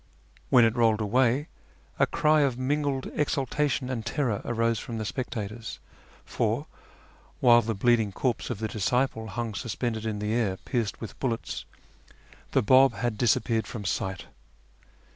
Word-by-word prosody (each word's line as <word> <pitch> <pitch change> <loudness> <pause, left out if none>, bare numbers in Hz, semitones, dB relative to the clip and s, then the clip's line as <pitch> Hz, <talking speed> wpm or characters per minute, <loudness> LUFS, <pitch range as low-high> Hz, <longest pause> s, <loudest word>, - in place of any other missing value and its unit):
"When 125 -4 +6
it 115 0 +1
rolled 115 -3 +3
away, 125 +6 +2 0.5
a - - +4
cry 155 0 +3
of 135 -4 +1
mingled 140 0 -1
exultation 145 -1 0
and 125 -3 -3
terror 115 -2 -1
arose 115 -1 0
from 115 +2 -6
the 110 - -3
sjDectators, 110 +1 -5 0.5
for, - - -1 0.7
while 120 -1 +6
the 115 -1 -2
bleeding 110 0 +2
corpse 120 +4 -1
of 120 - -3
the 110 +2 -2
disciple 110 +2 0
hung 110 +2 -4
suspended 115 0 -3
in 110 -1 -2
the 105 +1 -2
air 110 -5 0
pierced 115 -3 -3
with 115 - -8
bullets, 115 -4 -3 0.9
the - - +3
Bab 130 +5 +6
hod 120 -3 -2
disappeared 110 0 +1
from 105 -3 -6
sight 95 -1 -2
115 Hz, 145 wpm, -27 LUFS, 110-130 Hz, 0.9 s, When